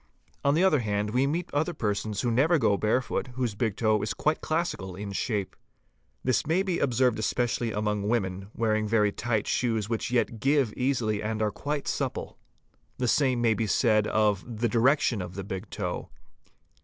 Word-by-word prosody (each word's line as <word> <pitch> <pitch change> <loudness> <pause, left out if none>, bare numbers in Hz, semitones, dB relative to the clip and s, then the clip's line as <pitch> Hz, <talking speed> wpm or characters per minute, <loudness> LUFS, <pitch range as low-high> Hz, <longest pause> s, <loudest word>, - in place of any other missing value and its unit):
On 140 +1 +3
the 170 - +3
other 185 -7 +4
hand 105 -2 -1
we 130 +4 +2
meet 165 +4 -3
other 155 +4 0
persons 105 -3 -2
who 120 - 0
never 150 +9 +4
go 110 -7 +3
barefoot, 115 +5 0
whose 125 -4 -1
big 105 -1 -1
toe 110 -2 +2
is 110 +1 -2
quite 155 +1 0
classical 155 - -2
in 100 +1 -6
shape. 100 -1 -2 0.7
This 130 +3 +1
May 175 +4 +2
be 185 -3 -1
observed 125 -3 +2
especially 120 +1 0
among 105 -1 -1
women, 95 -4 -1
wearing 110 -1 +1
very 105 -1 +3
tight 110 0 -1
fitting - - -4 0.3
shoes 105 -1 -2
which 115 -2 -2
yet 120 -2 0
give 135 -4 +2
easily 120 -5 0
and 110 0 -2
are 105 -1 +1
quite 145 +5 -3
supple. - - -3 0.6
'The 125 -2 0
same 130 -3 +2
may 115 -1 +4
be 110 +1 -1
said 110 -1 +3
f 105 -3 +2
the 120 0 -1
direction 125 0 +2
of 90 0 -7
the 100 - -4
big 95 +2 -6
toe. 90 -4 -4
115 Hz, 185 wpm, -27 LUFS, 105-130 Hz, 0.7 s, other